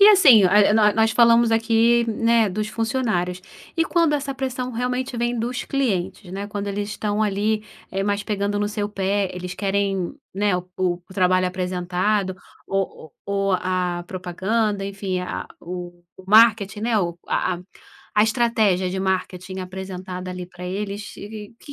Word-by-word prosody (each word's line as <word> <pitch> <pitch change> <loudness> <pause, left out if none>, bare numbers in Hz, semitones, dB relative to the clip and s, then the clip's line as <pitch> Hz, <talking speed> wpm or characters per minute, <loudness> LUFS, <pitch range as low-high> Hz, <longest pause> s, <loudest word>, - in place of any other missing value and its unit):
E 405 - +10
assim, 280 - +8
eh, 205 +2 +5
nó 210 -1 +5
nós 220 0 +3
falamos 235 0 +5
aqui, 230 +1 +3
né, 230 -1 +3
dos 210 +3 -2
funcionários. 220 -7 -1 0.4
E 330 - +3
quando 335 -3 +2
essa 280 -1 -2
pressão, 255 -1 -3
realmente, 250 +1 -2
vem 240 0 -1
dos 245 +3 -2
clientes, 200 -7 -2
né, 200 +1 -4
quando 205 0 -4
eles 205 +1 -3
estão, 210 0 -1
ali, 210 +1 0 0.3
eh, 195 - -1
mais 205 +1 0
pegando 205 -1 -1
no 205 0 0
seu 210 -1 -2
pé, 200 -1 0
eles 180 0 -5
querem, 195 0 -1 0.2
né, 200 -2 +2
o 180 - -3
o 185 -2 +1
o 190 - -13
trabalho 185 -1 +3
apresentado, 185 +2 -1 0.3
ou 195 -5 -3 0.2
o 200 - -3
ou 195 0 +1
a 180 -1 0
propaganda, 195 +3 -1
enfim, 195 -2 -3
a 180 - -4
o 175 0 -7
o 190 - -14
marketing, 215 -1 +5
né, 225 -1 +1
o 170 -2 -1
a 185 - +1
a - - -10 0.5
a 210 - +5
estratégia 220 -6 +2
de 190 - -2
marketing 185 0 -2
apresentada, 185 0 -6
ali, 180 0 -5
para 180 0 -9
eles, 200 +2 -5
e 205 - -8 0.3
que 285 - -11
200 Hz, 170 wpm, -23 LUFS, 185-225 Hz, 0.5 s, E